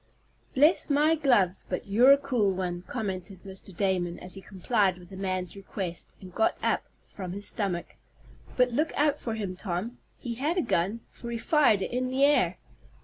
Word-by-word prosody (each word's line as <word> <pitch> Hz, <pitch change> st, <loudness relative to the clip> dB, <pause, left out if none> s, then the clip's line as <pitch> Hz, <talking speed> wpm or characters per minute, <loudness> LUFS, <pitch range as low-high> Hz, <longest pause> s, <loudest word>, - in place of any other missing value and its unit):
"Bless 300 Hz, +7 st, +4 dB
my 295 Hz, +2 st, +4 dB
gloves! 240 Hz, -, +3 dB
But 180 Hz, -, -3 dB
you're 235 Hz, +7 st, +6 dB
a -, -, +5 dB
cool 245 Hz, -9 st, 0 dB
one," 180 Hz, -1 st, -3 dB
commented 190 Hz, -5 st, -4 dB
Mr. 195 Hz, 0 st, -10 dB
Damon, 180 Hz, -3 st, 0 dB
as 180 Hz, -, -3 dB
he 195 Hz, -, -2 dB
complied 195 Hz, -1 st, 0 dB
with 180 Hz, 0 st, -14 dB
the -, -, -8 dB
man's 185 Hz, -1 st, -3 dB
request, 190 Hz, -3 st, -6 dB
and 185 Hz, -2 st, -12 dB
got 220 Hz, -, +1 dB
up -, -, +1 dB, 0.3 s
from 185 Hz, -3 st, -6 dB
his 200 Hz, +1 st, -3 dB
stomach. 180 Hz, -5 st, -3 dB, 0.6 s
"But 250 Hz, -1 st, +4 dB
look 305 Hz, +7 st, 0 dB
out 295 Hz, 0 st, +2 dB
for 225 Hz, -2 st, -3 dB
him, 200 Hz, -4 st, -4 dB
Tom. 190 Hz, +5 st, -4 dB, 0.2 s
He 240 Hz, -, -5 dB
had 295 Hz, +9 st, -1 dB
a -, -, +3 dB
gun, 210 Hz, 0 st, 0 dB
for 235 Hz, -, -9 dB
he 235 Hz, -, -2 dB
fired 235 Hz, -7 st, +3 dB
it -, -, -4 dB
in 255 Hz, +1 st, -1 dB
the 265 Hz, +2 st, +1 dB
air." 290 Hz, +1 st, +3 dB
205 Hz, 190 wpm, -28 LUFS, 185-255 Hz, 0.6 s, you're